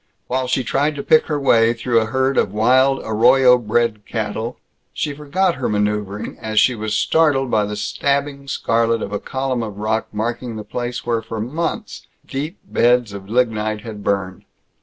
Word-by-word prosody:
While 130 0 -1
she 130 - 0
tried 145 +4 0
to 140 - -5
pick 155 -1 +4
her 150 -2 -1
way 115 -4 +4
through 120 0 +1
a - - -1
herd 130 +3 0
of - - +2
wild, 130 +5 +3
arroyo 125 +3 +5
bred 115 -1 0
cattle, 110 +2 -3 0.4
she 150 - -2
forgot 160 +6 0
her 130 - -1
maneuvering 105 -1 -2
as 110 -1 0
she 125 - +4
was 110 -2 -3
startled 140 -6 +2
by 105 -1 +2
the 105 +1 -4
stabbing 140 +6 -1
scarlet 115 -3 +1
of 100 - -5
a 105 - -1
column 130 0 -2
of 105 -3 -6
rock 110 +1 -1
marking 115 +2 -3
the 110 - -6
place 120 +2 -4
where 115 -1 0
for 110 0 -6
months 155 +10 -4 0.2
deep 150 +7 -4
beds 120 - +2
of 100 0 -9
lignite 110 -3 0
had 110 -3 -8
burned. 95 -2 -2
120 Hz, 180 wpm, -20 LUFS, 110-135 Hz, 0.4 s, arroyo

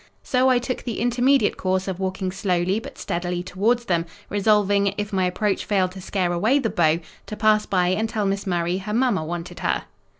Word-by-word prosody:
So 255 0 +2
I 255 - +4
took 245 +1 -3
the 235 -4 -4
intermediate 245 +1 +2
course 185 0 -1
of 190 -1 -3
walking 190 0 -2
slowly 185 +1 0
but - - -10
steadily 175 0 -3
towards 225 +7 0
them; 170 -3 0 0.2
resolving, 205 -1 +2
if 205 0 -4
my 190 -1 +2
approach 195 +2 0
failed 190 -3 +1
to 190 0 -9
scare 180 -2 -1
away 215 +11 +2
the 235 -6 0
beau, 165 0 +2 0.3
to 215 - -5
pass 215 0 +3
by 180 -2 +2
and 215 +4 0
tell 215 -3 -1
Miss 195 0 -1
Murray 175 0 0
her 210 +2 -4
mamma 235 -8 +2
wanted 170 +2 -6
her. - - 0
195 Hz, 200 wpm, -23 LUFS, 180-215 Hz, 0.3 s, I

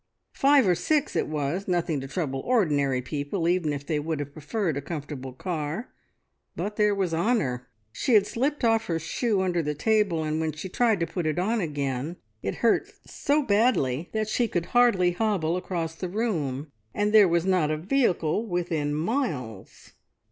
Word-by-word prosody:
Five 275 -4 +4
or 180 - +5
six 290 - 0
it - - +1
was, 155 +5 -2
nothing 170 -5 0
to 135 - -6
trouble 135 -2 -2
ordinary 145 - +1
people, 145 +6 -2
even 175 -3 +1
if 145 -1 -4
they 155 -1 0
would 155 0 -3
have 145 -1 -5
preferred 165 +2 -2
a 140 - -2
comfortable 145 -3 -6
car, 160 - -4 0.6
but 210 +1 -3
there 210 -1 +3
was 190 -4 -1
Honor! 160 - 0 0.2
She 235 - +1
had 205 -2 +6
slipped 275 +6 -1
off 225 -1 +2
her 165 - 0
shoe 200 +5 0
under 180 -2 +1
the 150 -1 -2
table, 200 -2 +1
and 155 0 -1
when 160 -1 -1
she 155 +6 -7
tried 220 -2 +2
to - - +2
put 170 -1 -3
it 155 +1 -1
on 215 +5 +1
again 145 -1 -2 0.3
it 95 - -3
hurt 380 - +3 0.2
so 290 +1 0
badly 200 - +2
that 220 -1 -1
she 235 +2 +1
could 175 -5 -2
hardly 235 -8 +4
hobble 175 -4 0
across 175 -3 -3
the 180 +2 -5
room, 160 - -2 0.2
and 210 +1 +1
there 210 -3 +8
was 170 0 +1
not 185 -5 +2
a 155 - 0
vehicle 195 - +1
within 170 -5 -1
miles. 150 - -3
175 Hz, 180 wpm, -26 LUFS, 150-210 Hz, 0.6 s, there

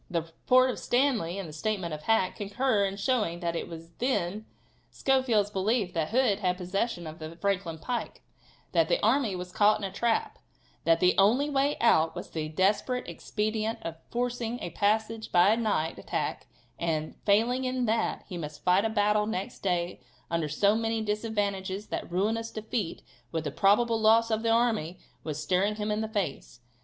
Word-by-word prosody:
The 170 -3 -1
report 255 +10 +3
of - - -6
Stanley 245 -9 +1
and 195 -3 -5
the 155 - -10
statement 180 0 -2
of 150 - -5
Hack 190 +1 +2
concur 205 +1 +1
in 195 0 -3
showing 205 -6 0
that 170 -1 -1
it - - -3
was 165 0 -10
then 215 -4 -1 0.4
Schofield's 245 -7 +1
belief 200 0 0
that 160 -2 -1
Hood 230 -3 +2
had 180 -3 0
possession 185 +1 -2
of 155 +1 -8
the 160 +1 -7
Franklin 180 -3 -1
pike; 240 +9 -4 0.5
that - - +2
the - - +2
army 245 -9 +2
was 180 0 -6
caught 210 +3 +4
in 215 - -9
a 195 - -2
trap; 225 +3 0 0.5
that 165 0 +4
the 180 0 +5
only 250 +9 +4
way 280 +1 +1
out 160 -8 +3
was 175 - -7
the 155 -1 -3
desperate 205 +9 +1
expedient 215 +1 -2
of 165 -1 -5
forcing 245 -1 -2
a 175 - -5
passage 220 +1 0
by 180 +2 +5
a - - +4
night 210 -9 -1
attack, - - -3 0.3
and, 155 -2 -1
failing 230 +5 +3
in 255 -1 0
that, 225 +1 0
he 180 - -6
must 150 -2 -7
fight 180 +2 +4
a 225 - +1
battle 210 -1 +2
next 195 -3 -4
day 175 -2 -1 0.3
under 165 -2 0
so 200 +8 +3
many 225 0 -1
disadvantages 205 -2 -2
that - - -4
ruinous 220 +5 0
defeat, 215 -4 -4 0.3
with 160 - -2
the 150 - -3
probable 225 +3 +3
loss 225 +1 +5
of 220 0 +1
the 230 - 0
army, 225 -7 +1 0.3
was 155 -2 -4
staring 185 +6 +1
him 210 0 -2
in 210 +1 0
the 220 - -2
face. 205 - -4
205 Hz, 185 wpm, -28 LUFS, 175-225 Hz, 0.5 s, the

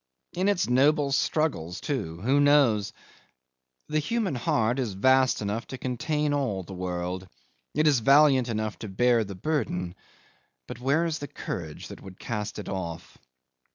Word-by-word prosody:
In 185 +3 +1
its 200 -4 +1
noble 140 +3 +3
struggles 135 - 0
too 100 - -3
who 135 +6 +3
knows? 140 -8 +4 1.0
The 155 0 0
human 205 +4 -1
heart 120 0 +1
is 120 -6 -1
vast 130 +4 +3
enough 105 +3 -3
to 130 - -6
contain 145 +4 -1
all 125 -10 -1
the 95 - -10
world. 90 0 -4 0.5
It 155 +2 +2
is 145 -5 +4
valiant 135 0 +5
enough 110 -2 -3
to 110 - -6
bear 120 +3 +3
the 100 -2 -7
burden, 90 - -2 0.7
but - - -8
where 140 +7 +2
is 160 -2 -2
the 145 - -5
courage 80 - -6
that - - -10
would 95 -1 -11
cast 105 -2 -4
it 105 - -6
off? 85 -4 -6
125 Hz, 155 wpm, -27 LUFS, 100-145 Hz, 1.0 s, valiant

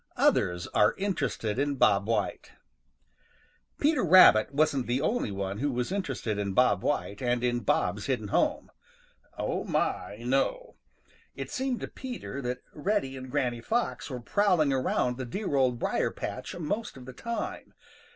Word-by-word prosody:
OTHERS 90 0 +2
ARE 105 - +4
INTERESTED 135 - -2
IN 140 0 0
BOB 105 -6 +3
WHITE 115 -1 -1 1.3
|PETER 295 -2 +2
RABBIT 165 - +7
wasn't 140 -3 +1
the 120 +2 +1
only 185 - 0
one 100 0 -4
who 145 +2 0
was 125 +4 -2
interested 135 - -2
in 100 -1 -2
Bob - - +4
White 100 - -2
and 120 -1 0
in 120 -1 +1
Bob's 105 -2 0
hidden 110 -6 -1
home. - - 0 0.7
Oh, - - -2
my, 100 - -1
no! 135 - -1 0.6
It - - -6
seemed 260 -2 -2
to - - -3
Peter 245 - -6
that 125 0 -4
Reddy 155 -4 -1
and 130 0 -8
Granny 125 -4 -1
Fox 235 - -1
were 130 -2 -4
prowling 170 - +2
around 125 -1 0
the 130 - -4
dear 190 - -3
Old 130 -3 +2
Briar - - 0
patch - - -6
most 190 +3 -3
of 125 - -11
the 130 - -9
time. 235 - -5
130 Hz, 155 wpm, -28 LUFS, 120-185 Hz, 1.3 s, RABBIT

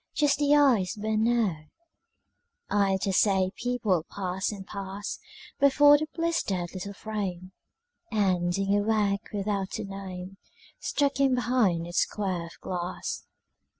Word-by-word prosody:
Just 290 -1 +2
the 290 0 +4
eyes 245 -11 +4
burn 215 +1 0
now. 215 -10 +1 1.1
I 200 -2 +3
dare 195 - 0
say 190 -1 +3
people 235 -9 0
pass 190 0 -2
and 195 -2 -8
pass 200 0 -6 0.4
Before 290 +1 +7
the 310 +1 0
blistered 205 - -1
little 200 +1 -6
frame, 190 -4 -4 0.6
And 185 -5 +1
dingy 195 +2 +1
work 205 -1 0
without 200 -1 -2
a - - -4
name 195 -1 -7 0.4
Stuck 280 -1 0
in 270 -2 +4
behind 235 -9 +1
its 175 0 -1
square 185 -5 -1
of 170 - -15
glass. 180 0 -4
200 Hz, 130 wpm, -27 LUFS, 185-235 Hz, 1.1 s, Before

